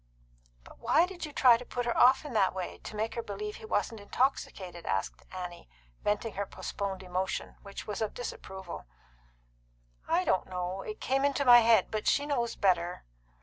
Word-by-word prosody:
"But - - -16
why 330 - +4
did 360 -3 -6
you - - -10
try 250 -4 +6
to 245 - -8
put 245 0 -3
her 240 - 0
off 260 +4 +6
in 290 - -6
that 195 -4 +3
way 185 -2 -5
to - - -7
make 220 +2 -1
her 235 - -2
believe 210 0 -5
he - - -10
wasn't 215 +1 -1
intoxicated?" 200 -6 -2
asked 95 0 -1
Annie, 180 - -7 0.3
venting 210 +2 0
her 200 +1 -3
postponed 195 -2 -4
emotion, 185 +1 -3
which 200 -1 -8
was 210 0 -4
of 220 - -2
disapproval. 190 - -7 1.2
"I - - +2
don't 185 - +1
know. 180 +1 -3
It 430 0 -7
came 270 +1 +1
into 280 0 +1
my 240 -1 +10
head. 225 -4 +4
But 215 -1 -2
she 285 - +3
knows 240 -6 -1
better." 180 -3 +1
210 Hz, 185 wpm, -30 LUFS, 185-245 Hz, 1.2 s, my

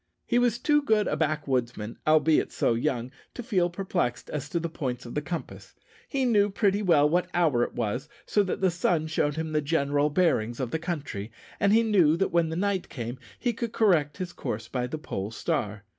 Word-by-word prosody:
He 240 - +2
was 240 -2 +2
too 295 +4 +3
good 220 -6 +2
a - - 0
backwoodsman, 130 -8 -1
albeit 155 0 +4
so - - +1
young, 125 0 -1 0.2
to 245 - -5
feel 185 -7 +1
perplexed 175 -9 -2
as 150 -1 -4
to 170 - -1
the 170 - -2
points 130 -7 -4
of 120 - -8
the 150 - -1
compass. 170 +2 -7 0.3
He 270 -2 0
knew 205 -4 +4
pretty 200 0 +1
well 160 -7 +4
what 175 +4 +1
hour 155 -9 +3
it - - -1
was, 125 +5 -2 0.2
so 210 - +2
that 190 -1 -2
the 190 -2 +3
sun 170 -2 +1
showed 150 -2 0
him 160 0 -3
the 155 0 +1
general 145 -1 +1
bearings 130 -9 +1
of 125 -3 -2
the 160 - -1
country, 145 - -4 0.3
and 200 - +3
he 225 +2 +5
knew 180 -8 +4
that 195 - 0
when 170 -1 +2
night 190 +3 -1
came 120 0 -5 0.2
he 240 -2 -1
could 230 0 -4
correct 160 -9 +2
his 180 -1 -5
course 110 +1 -4
by 125 0 -2
the 155 - -4
pole 100 -9 -4
star. 105 -2 -2
160 Hz, 205 wpm, -27 LUFS, 130-190 Hz, 0.3 s, he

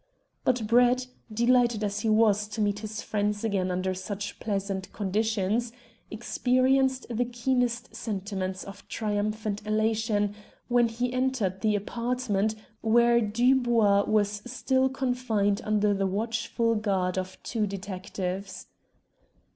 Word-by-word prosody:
But 250 -3 +1
Brett, 245 +3 +4 0.3
delighted 235 0 +3
as 205 0 -1
he 225 - 0
was 215 -1 +3
to 210 +1 -7
meet 205 -1 +1
his 215 0 -6
friends 210 0 -1
again 195 -4 0
under 185 +1 -1
such 200 +2 -5
pleasant 195 -2 -3
conditions, 215 +2 0 0.4
experienced 255 +3 +1
the 240 0 0
keenest 245 0 -1
sentiments 190 -3 -3
of 200 0 -11
triumphant 210 0 -2
elation 215 -1 +1 0.4
when 240 -1 +4
he 245 +2 -2
entered 255 -8 0
the 215 -2 +2
apartment 220 -1 -1 0.3
where 235 +1 +4
Dubois 230 -2 +3
was 205 -1 +1
still 260 +1 +1
confined 245 -6 0
under 210 -1 +2
the 195 -1 0
watchful 230 +3 0
guard 195 -4 0
of 185 0 -4
two 220 -3 -1
detectives. 190 -1 -5
215 Hz, 120 wpm, -27 LUFS, 200-240 Hz, 0.4 s, Brett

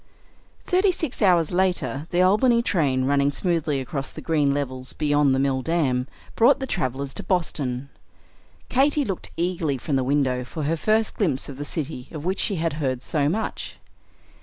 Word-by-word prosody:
Thirty 375 +1 +3
six 320 -9 -3
hours 175 -6 +4
later 175 -5 0
the 175 +1 +2
Albany 235 +5 +4
train, 135 - +1
running 140 +1 +2
smoothly 160 -2 0
across 135 +1 -4
the - - -10
green 150 -4 +1
levels 130 -2 -3
beyond 145 -2 +2
the - - 0
Mill 135 -1 +1
Dam, 135 -5 0 0.3
brought 245 +5 +5
the 265 - -2
travellers 140 - -2
to - - -6
Boston. 140 -8 -1 0.8
Katy 285 +2 +2
looked 195 -5 -4
eagerly 170 -5 -1
from 135 +2 -1
the 130 - +1
window 130 -2 +1
for 150 +5 -6
her 155 +3 +1
first 215 +7 +1
glimpse 150 - 0
of 135 - -8
the 145 - -4
city 145 -4 -4
of 155 -1 -7
which 190 +2 -1
she 200 - +2
had 165 -2 -1
heard 130 -3 -1
so 145 -2 +1
much. 215 +7 -3
150 Hz, 175 wpm, -24 LUFS, 135-185 Hz, 0.8 s, brought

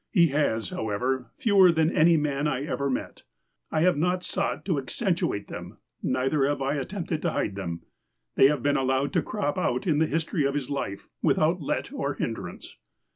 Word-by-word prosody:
He 170 -6 +4
has, 135 -7 0
however, 125 +4 -2
fewer 195 -5 +6
than 160 0 +2
any 165 +1 +5
man 145 -1 0
I 135 -2 -1
ever 140 -2 -1
met. 130 - -4 0.5
I 155 - 0
have 180 -2 +4
not 180 +3 +1
sought 195 - -2
to 170 -7 +1
accentuate 170 - -1
them; - - -8 0.2
neither 135 +3 +1
have 145 0 -1
I 140 +2 0
at 135 - -5
tempted 175 -5 -3
to 170 - +1
hide 100 - -1
them. 85 -4 -5 0.5
They 135 - +6
have 150 +1 0
been 145 0 +2
allowed 135 +1 0
to - - +3
crop 200 -9 -2
out 125 +1 0
in 155 -5 +2
the 160 - +3
history 165 0 -1
of 140 +1 0
his 145 -1 -3
life, 100 -8 -4
without - - +2
let - - -2
or - - -2
hindrance. - - -5
145 Hz, 190 wpm, -26 LUFS, 130-170 Hz, 0.5 s, fewer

